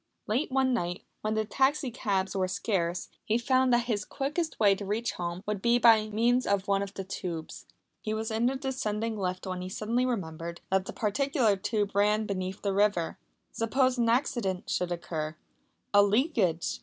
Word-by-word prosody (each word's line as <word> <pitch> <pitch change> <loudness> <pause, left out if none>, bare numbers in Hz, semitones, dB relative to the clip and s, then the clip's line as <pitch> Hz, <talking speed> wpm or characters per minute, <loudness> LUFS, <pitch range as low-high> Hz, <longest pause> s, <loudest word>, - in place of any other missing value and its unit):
Late 250 +8 0
one 260 -1 +2
night, 175 -5 -2 0.2
when 215 0 -1
taxi 265 +3 +1
cabs 195 -5 -1
were 185 -1 +1
scarce, 180 -2 -1 0.2
he 220 - +1
found 255 +2 +2
that 240 0 +4
his 220 -4 -1
quickest 300 +7 -3
way 205 -3 +6
to 195 - -5
reach 215 +4 -1
home 175 +1 -5
would 210 -2 -2
be 235 +2 +4
by 225 -3 +5
means 240 +4 +2
of 200 -1 +1
one 200 0 +2
of 200 0 -5
the 195 - -4
tubes. 175 -4 -6 0.3
He 215 - -3
was 220 +1 -2
in 225 +2 +2
the 265 - 0
descending 230 -5 -2
lift 185 -2 -3
when 185 -1 -4
he 185 - -5
suddenly 230 +6 0
remembered 170 -7 -4
that 190 0 +2
that - - -6
particular 235 0 +2
tube 205 +1 -1
ran 210 +2 +3
beneath 190 -1 -4
the 200 -1 0
river. 200 -4 +1 0.3
Suppose 255 +2 +1
an 230 -1 +3
accident 230 -6 0
should 180 -1 0
occur 160 -3 -3 0.6
a 205 - +8
leakage! 205 - +1
210 Hz, 180 wpm, -29 LUFS, 190-240 Hz, 0.6 s, a